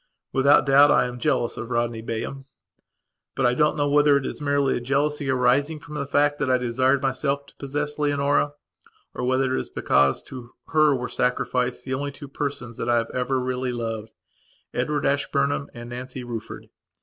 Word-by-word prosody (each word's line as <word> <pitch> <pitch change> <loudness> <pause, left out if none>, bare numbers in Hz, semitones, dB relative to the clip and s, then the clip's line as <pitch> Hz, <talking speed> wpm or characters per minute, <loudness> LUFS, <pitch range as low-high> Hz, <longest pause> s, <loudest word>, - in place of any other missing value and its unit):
Without 140 +2 +5
doubt 140 +1 +6
I - - +4
am 125 0 -6
jealous 120 0 0
of 120 - -6
Rodney 120 -1 -1
Bayham. 115 +4 -5 0.9
But 135 - +1
I 120 - +4
don't 150 +4 +2
know 145 -1 +1
whether 145 0 +5
it 135 - -3
is - - -5
merely 140 -2 +1
a - - -1
jealousy 140 +2 0
arising 130 +4 +2
from 150 - -12
the 140 -2 -3
fact 145 +1 +2
that 145 - 0
I 130 - +4
desired 130 +3 +1
myself 140 +1 -1
to - - -19
possess 145 +2 -3
Leonora 145 0 +1 0.6
or - - -5
whether 130 +1 +1
it - - 0
is - - -10
because 70 -1 +2
to 120 -2 -11
her 155 -2 +4
were 125 -1 -3
sacrificed 125 0 -1
the 130 - -3
only 140 +2 -2
two 145 +1 -10
persons 135 -4 -5
that - - -3
I 120 - +4
have 115 0 -1
ever 130 +1 0
really 125 0 -2
lovedEdward 120 +4 -5
Ashburnham 140 0 0
and 120 0 -9
Nancy 125 +1 -6
Rufford. 115 -3 -7
135 Hz, 185 wpm, -24 LUFS, 125-145 Hz, 0.9 s, doubt